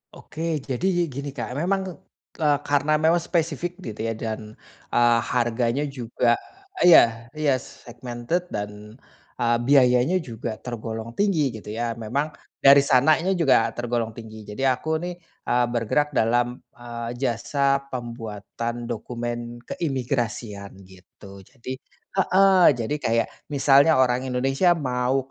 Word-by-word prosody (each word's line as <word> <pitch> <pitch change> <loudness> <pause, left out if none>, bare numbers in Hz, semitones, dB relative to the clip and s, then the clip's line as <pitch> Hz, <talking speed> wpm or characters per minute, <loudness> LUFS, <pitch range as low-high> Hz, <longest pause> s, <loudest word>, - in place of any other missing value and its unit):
Oke 160 0 -4
jadi 135 +2 -5
yi 175 -1 +1
gini 140 0 -6
Kak, 125 -2 -5
memang, 185 +6 0 0.5
eee, 145 -2 +2
karena 145 +1 +2
memang 160 +2 +4
spesifik 170 +2 -1
gitu 110 - -8
ya, - - 0
dan, 110 -1 -6 0.3
eee, 120 -1 +4
harganya 120 +3 0
juga 120 0 +1 0.5
iya 120 -8 +6
iya 150 -2 +1
segmented 120 +7 -5
dan, 105 +2 -7 0.4
eee, 120 -1 +2
biayanya 130 +5 +4
juga 115 -7 -6
tergolong 115 -1 -6
tinggi 160 - +1
gitu 105 -1 -8
ya, 115 +1 -2
memang 120 +7 -2 0.3
dari 140 0 +7
sananya 150 +7 +3
juga 135 -8 +4
tergolong 120 -2 -2
tinggi. 110 -1 -10
Jadi 105 +6 -2
aku 155 +5 0
nih, 175 +1 -5 0.3
eee, 120 0 +3
bergerak 120 +6 0
dalam, 120 0 +1 0.2
eee, 120 -1 -6
jasa 135 +3 0
pembuatan 115 -1 -5
dokumen 120 +1 -4 0.2
keimigrasian, 120 - -3
gitu. 95 +1 -15
Jadi 130 +5 -9 0.3
heeh, 190 -4 +5
jadi 120 +5 -2
kayak, 115 -3 +1 0.2
misalnya 140 +2 +5
orang 130 0 +2
Indonesia 135 +8 +2
mau 130 -2 0
125 Hz, 125 wpm, -24 LUFS, 115-145 Hz, 0.5 s, dari